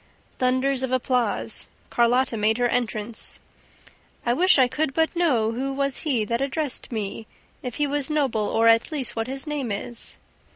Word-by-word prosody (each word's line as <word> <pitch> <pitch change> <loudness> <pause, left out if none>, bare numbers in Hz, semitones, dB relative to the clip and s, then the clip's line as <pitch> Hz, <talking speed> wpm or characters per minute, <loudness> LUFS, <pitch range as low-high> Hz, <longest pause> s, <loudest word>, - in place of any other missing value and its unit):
Thunders 260 +1 +2
of 260 -1 -1
applause. 250 -3 0 0.2
Carlotta 240 +1 +2
made 220 +1 +2
her 245 0 +2
entrance. 230 -2 -1 0.9
"I 240 - +3
wish 365 +6 +4
I 260 -2 +5
could 295 +2 -1
but 320 +2 +1
know 255 -11 +2
who 265 +4 -2
was 275 0 -1
he 250 -8 0
That 235 +3 -1
addressed 280 -1 -1
me, 220 -1 -4 0.3
If 250 -3 -5
he 295 - +1
was 285 0 -1
noble, 265 -9 +1
or, 225 +1 +2
at 230 +6 +4
least, 275 -6 -1
what 225 0 -2
his 270 +2 -5
name 290 -6 -3
is 225 +3 -4
255 Hz, 170 wpm, -24 LUFS, 230-275 Hz, 0.9 s, I